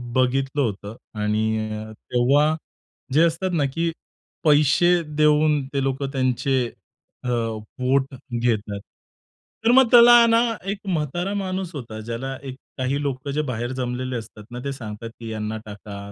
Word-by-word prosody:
बघितलं 135 +2 +1
होतं 105 -3 -3 0.2
आणि 110 +1 0
अ, 110 0 -6
तेव्हा 140 +7 +2 0.6
जे 155 +4 +5
असतात 170 +3 -1
ना, 150 -4 +2
की 165 +2 0 0.5
पैसे 155 +4 +4 0.2
देऊन 150 -1 +4
ते 140 -1 0
लोकं 135 +1 -1
त्यांचे 130 0 +1 0.6
अ, 125 - -2 0.5
वोट 135 +1 +1 0.3
घेतात. 105 -4 0 0.9
तर 235 - +6
मग 260 0 +7
त्याला 240 0 +9
ना 230 0 +5 0.3
एक 205 - -3
म्हातारा 175 +2 -1
माणूस 190 -2 -3
होता 115 -5 -6
ज्याला 120 +4 -5
एक 130 -2 -6 0.2
काही 130 +2 -1
लोक 140 -1 -3
जे 150 - +1
बाहेर 120 -4 -3
जमलेले 130 0 -3
असतात 110 -2 -7
ना 120 - -5
ते 140 - -1
सांगतात, 115 -2 -7
की 115 -1 -6
"यांना 110 0 -3
टाका. 100 -1 -9
130 Hz, 145 wpm, -23 LUFS, 115-150 Hz, 0.9 s, त्याला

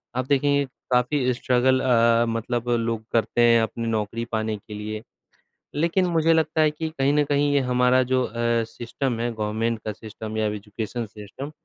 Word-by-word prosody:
आप 130 - -1
देखेंगे 140 0 +2 0.3
काफ़ी 125 +1 +2
स्ट्रगल 130 +1 +2
अ, 115 -2 +4
मतलब 120 +1 -2
लोग 115 -2 0
करते 115 +1 +1
हैं 115 -1 +6
अपनी 115 +1 -3
नौकरी 115 +1 -2
पाने 110 -1 -1
के 105 +1 -12
लिए। 105 +1 -5 0.7
लेकिन 170 +5 +2
मुझे 165 -1 +3
लगता 160 0 +2
है 155 -1 +4
कि 160 +1 -4
कहीं 140 -2 +1
न 150 - +3
कहीं 145 0 +2
ये 140 - +4
हमारा 125 0 +3
जो 130 0 +3
अ, 115 - -5 0.3
सिस्टम 120 +1 -3
है 120 0 -1
गवर्नमेंट 110 +1 -1
का 110 - -1
सिस्टम 110 +1 -8
या 110 - +1
एजुकेशन 105 +3 -4
सिस्टम 110 +7 -9
120 Hz, 175 wpm, -24 LUFS, 110-135 Hz, 0.7 s, हैं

